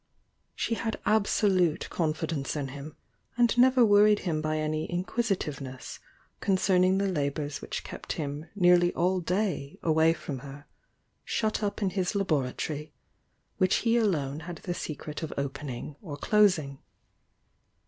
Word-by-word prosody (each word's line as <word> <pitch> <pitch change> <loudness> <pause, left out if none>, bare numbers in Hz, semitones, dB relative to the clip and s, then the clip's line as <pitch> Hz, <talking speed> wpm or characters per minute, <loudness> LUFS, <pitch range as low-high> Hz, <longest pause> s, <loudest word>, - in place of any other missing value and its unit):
She - - -1
had 225 -1 -2
absolute 200 -5 +2
confi 160 -2 -1
dence 145 -4 -3
in 140 -3 -3
him, 140 +3 -9 0.4
and 240 0 +4
never 250 0 +6
worried 210 0 +5
him 160 -4 -1
by 155 0 -1
any 155 0 -1
inquisi 195 +5 0
tiveness 135 -5 -7 0.4
concerning 185 -1 +3
the 200 - +1
labours 145 -4 -2
which - - -5
kept - - -6
him 150 +1 -5
nearly 175 -2 +5
all 185 +2 +2
day 180 -5 -2
away 160 0 +4
from 140 -5 -6
her, 140 +2 -10 0.6
shut 220 -1 -1
up 205 0 -2
in 190 - +1
his 185 +1 -1
labor 155 -10 +1
atory, 150 +2 -4 0.7
which 185 +1 +3
he 230 0 +4
alone 155 - +1
had 175 +2 -7
the 175 - -2
secret 150 -2 -6
of 160 - -4
opening 140 -1 -4
or 150 -7 -7
closing. 165 -8 +2
170 Hz, 145 wpm, -28 LUFS, 145-200 Hz, 0.7 s, never